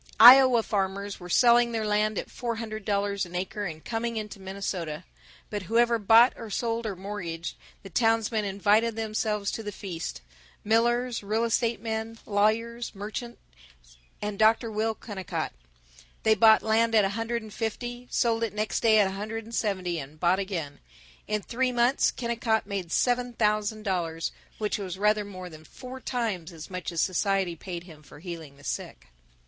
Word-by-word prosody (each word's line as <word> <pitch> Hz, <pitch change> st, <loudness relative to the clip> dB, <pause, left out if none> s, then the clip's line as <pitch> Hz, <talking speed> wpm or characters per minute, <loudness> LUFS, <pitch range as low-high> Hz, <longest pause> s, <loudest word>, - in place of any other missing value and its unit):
Iowa 250 Hz, 0 st, +9 dB
farmers 200 Hz, -1 st, -2 dB
were 180 Hz, -1 st, -9 dB
selling 235 Hz, +3 st, +5 dB
their 220 Hz, -1 st, -1 dB
land 210 Hz, 0 st, +1 dB
at -, -, -4 dB
four 235 Hz, -2 st, -3 dB
hundred 220 Hz, -2 st, -6 dB
dollars 200 Hz, -1 st, 0 dB
an 175 Hz, -1 st, -7 dB
acre 190 Hz, +3 st, -3 dB
and 160 Hz, -4 st, -7 dB
coming 230 Hz, 0 st, -2 dB
into 210 Hz, -1 st, -5 dB
Minnesota. 190 Hz, -5 st, -4 dB, 0.5 s
But 205 Hz, -, -2 dB
whoever 235 Hz, 0 st, +3 dB
bought 225 Hz, +4 st, +6 dB
or 230 Hz, -, -8 dB
sold 230 Hz, +2 st, -1 dB
or 200 Hz, -, -3 dB
mortgaged, 180 Hz, -4 st, -5 dB, 0.3 s
the 195 Hz, -, -9 dB
townsmen 225 Hz, 0 st, +2 dB
invited 205 Hz, +3 st, +2 dB
themselves 215 Hz, -2 st, -1 dB
to -, -, -4 dB
the 210 Hz, -1 st, -5 dB
feast 180 Hz, -5 st, -6 dB, 0.4 s
millers, 240 Hz, +2 st, +2 dB
real 215 Hz, +3 st, 0 dB
estate 230 Hz, 0 st, +1 dB
men, 225 Hz, 0 st, -3 dB
lawyers, 225 Hz, +3 st, 0 dB
merchants, 220 Hz, +4 st, -6 dB, 0.9 s
and 205 Hz, -1 st, -3 dB
Dr. 225 Hz, +1 st, +4 dB
Will 220 Hz, +1 st, 0 dB
Kennicott. 195 Hz, -, -5 dB, 0.7 s
They 220 Hz, -, +5 dB
bought 220 Hz, +1 st, +6 dB
land 225 Hz, +1 st, +2 dB
at 210 Hz, -2 st, +6 dB
a -, -, +1 dB
hundred 225 Hz, +2 st, -2 dB
and 215 Hz, -2 st, -11 dB
fifty, 240 Hz, +2 st, -4 dB
sold 230 Hz, -1 st, +1 dB
it 220 Hz, -2 st, -2 dB
next 210 Hz, -4 st, -1 dB
day 220 Hz, -1 st, +5 dB
at 210 Hz, -, +6 dB
a 190 Hz, -, -1 dB
hundred 215 Hz, +3 st, -5 dB
and 230 Hz, +2 st, -12 dB
seventy, 185 Hz, -6 st, -1 dB
and 145 Hz, +2 st, -9 dB
bought 180 Hz, +3 st, +3 dB
again. 175 Hz, -8 st, -4 dB, 0.5 s
In 210 Hz, -1 st, -1 dB
three 255 Hz, +1 st, 0 dB
months 245 Hz, +2 st, +3 dB
Kennicott 235 Hz, -2 st, -1 dB
made 195 Hz, -4 st, -4 dB
seven 245 Hz, +2 st, +1 dB
thousand 215 Hz, -1 st, 0 dB
dollars, 170 Hz, -5 st, -1 dB, 0.3 s
which 210 Hz, -1 st, -1 dB
was 190 Hz, -2 st, -5 dB
rather 210 Hz, +1 st, +2 dB
more 185 Hz, -3 st, -8 dB
than 155 Hz, -2 st, -12 dB
four 255 Hz, +9 st, -10 dB
times 215 Hz, -11 st, -2 dB
as 165 Hz, +1 st, -10 dB
much 180 Hz, -2 st, -4 dB
as 170 Hz, -, 0 dB
society 190 Hz, -1 st, +1 dB
paid 175 Hz, +1 st, -7 dB
him 160 Hz, -4 st, -14 dB
for 140 Hz, -, -15 dB
healing 160 Hz, -4 st, -8 dB
the 145 Hz, -, -17 dB
sick. -, -, -5 dB
210 Hz, 175 wpm, -27 LUFS, 190-230 Hz, 0.9 s, Iowa